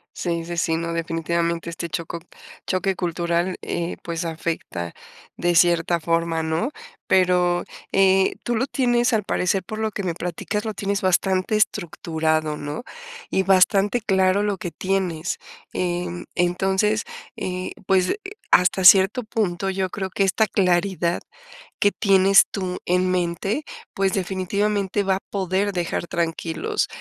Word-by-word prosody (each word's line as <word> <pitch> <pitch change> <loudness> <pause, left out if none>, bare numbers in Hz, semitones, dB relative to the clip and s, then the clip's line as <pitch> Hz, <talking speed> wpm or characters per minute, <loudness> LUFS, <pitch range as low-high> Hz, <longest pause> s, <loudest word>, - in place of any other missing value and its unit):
Sí, 170 -2 -2
sí, 170 +1 -6
si, 165 -1 +1
no, 165 +1 -2
definitivamente 170 0 -1
este 170 0 -5
choco 165 +1 -4 0.5
choque 190 +1 0
cultural, 170 +1 -1
eh, 170 0 -3
pues 170 0 -3
afecta 160 - -4 0.4
de 175 0 +1
cierta 170 0 +3
forma, 165 0 0
¿no?, 160 +9 -1 0.4
pero, 180 -1 +3 0.3
eh, 190 0 +4
tú 240 - -1
lo 255 +5 0
tienes, 240 -2 +2
al 220 -3 +1
parecer, 185 0 0
por 215 +3 -6
lo 220 0 -1
que 200 - -4
me 180 -3 -2
platicas, 180 +5 -3
lo 220 - -2
tienes 200 0 -2
bastante 185 +2 +1
estructurado, 160 -6 0
¿no?, 145 +9 -5 0.5
y 190 - +1
bastante 195 +4 +4
claro 190 -1 +2
lo 205 -2 0
que 185 -4 -5
tienes. 185 -3 -1 0.4
En 175 -1 -2
entonces, 190 +4 +1 0.3
eh, 185 0 -3
pues, 190 - +2 0.4
hasta 180 +1 +4
cierto 195 +6 +7
punto, 195 -4 -1
yo 190 -1 -1
creo 190 0 -4
que 195 - 0
esta 210 +3 +2
claridad 180 -2 +1 0.6
que 205 - +4
tienes 195 -1 +5
tú 185 -2 -3
en 180 +1 +2
mente, 185 - -1 0.3
pues, 195 -1 +1
definitivamente 200 +2 0
va 190 -1 +2
a - - -3
poder 195 +1 0
dejar 175 -1 -2
tranquilos 165 -1 -1
185 Hz, 140 wpm, -23 LUFS, 170-195 Hz, 0.6 s, cierto